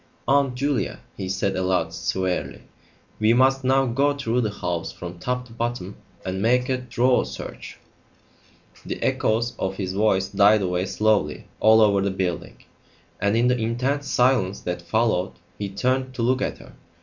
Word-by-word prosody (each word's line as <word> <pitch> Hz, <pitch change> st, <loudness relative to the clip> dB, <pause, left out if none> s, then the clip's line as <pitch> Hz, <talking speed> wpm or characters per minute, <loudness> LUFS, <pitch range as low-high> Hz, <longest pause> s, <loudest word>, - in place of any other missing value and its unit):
"Aunt 140 Hz, -2 st, +3 dB
Julia," 140 Hz, -2 st, -1 dB, 0.2 s
he 95 Hz, -, -5 dB
said 95 Hz, +1 st, -1 dB
aloud, 90 Hz, -3 st, 0 dB
severely, 90 Hz, +2 st, -2 dB, 0.6 s
"we 110 Hz, +2 st, +4 dB
must 135 Hz, +1 st, +3 dB
now 135 Hz, +1 st, +3 dB
go 140 Hz, +4 st, +1 dB
through 125 Hz, -3 st, 0 dB
the 110 Hz, -, 0 dB
house 90 Hz, -4 st, -3 dB
from 90 Hz, 0 st, -8 dB
top 125 Hz, +5 st, -2 dB
to 120 Hz, -, -15 dB
bottom 115 Hz, -4 st, -3 dB, 0.3 s
and 95 Hz, +1 st, -3 dB
make 125 Hz, +3 st, +2 dB
a 130 Hz, -1 st, 0 dB
thorough 125 Hz, 0 st, +2 dB
search." -, -, -8 dB, 1.1 s
The -, -, -5 dB
echoes 115 Hz, +2 st, +1 dB
of 95 Hz, 0 st, -2 dB
his 95 Hz, -1 st, -3 dB
voice 95 Hz, -2 st, +2 dB
died 100 Hz, +1 st, +4 dB
away 90 Hz, +1 st, -1 dB
slowly 105 Hz, -8 st, +1 dB
all 110 Hz, +1 st, +6 dB
over 100 Hz, -2 st, +4 dB
the 100 Hz, -, +1 dB
building, 95 Hz, -2 st, -4 dB, 0.6 s
and 100 Hz, +3 st, +1 dB
in 120 Hz, +1 st, +3 dB
the 125 Hz, 0 st, +2 dB
intense 130 Hz, +5 st, -1 dB
silence 125 Hz, -7 st, +2 dB
that 90 Hz, 0 st, -4 dB
followed 95 Hz, 0 st, 0 dB, 0.3 s
he 100 Hz, -1 st, -3 dB
turned 130 Hz, +6 st, -1 dB
to 120 Hz, -, -2 dB
look 130 Hz, +2 st, +2 dB
at -, -, -2 dB
her. -, -, -15 dB
110 Hz, 165 wpm, -24 LUFS, 95-125 Hz, 1.1 s, all